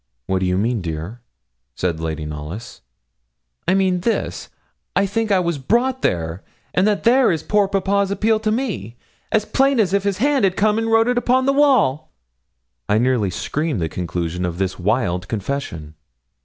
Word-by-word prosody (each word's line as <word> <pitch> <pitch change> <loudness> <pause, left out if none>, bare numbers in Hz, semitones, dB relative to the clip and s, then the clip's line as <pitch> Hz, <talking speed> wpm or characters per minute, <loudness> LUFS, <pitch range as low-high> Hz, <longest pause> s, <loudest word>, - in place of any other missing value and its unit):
'What 95 0 0
do 95 - 0
you 90 0 +1
mean, 115 +2 0
dear?' 85 +7 -5 0.5
said 85 -3 -1
Lady 80 -1 -3
Knollys. 75 +9 -7 0.9
'I 185 - +4
mean 190 -2 +2
this 225 +6 -2 0.5
I 200 - +3
think 215 +2 -1
I 195 - +5
was 170 -4 -1
brought 245 - +1
there, 85 +1 -1 0.3
and 185 +3 +3
that 205 -2 0
there 245 0 +5
is 160 -2 -2
poor 205 +1 +2
papa's 195 0 +1
appeal 215 +2 +1
to 215 0 -1
me, 200 - -3 0.3
as 215 -1 +2
plain 270 +1 +2
as 195 -4 +2
if 200 - +3
his 200 -2 0
hand 260 -5 +2
came 215 +1 +2
and 225 0 -1
wrote 225 +1 +4
it 245 0 +2
upon 255 +1 +2
the 275 - +3
wall.' 260 - +3 0.8
I 105 - +3
nearly 120 -4 +2
screamed 150 - -2
the 80 -2 -1
conclusion 90 0 -3
of 85 -1 -2
this 95 0 -2
wild 90 -3 0
confession. 100 - -4
165 Hz, 175 wpm, -20 LUFS, -, 0.9 s, I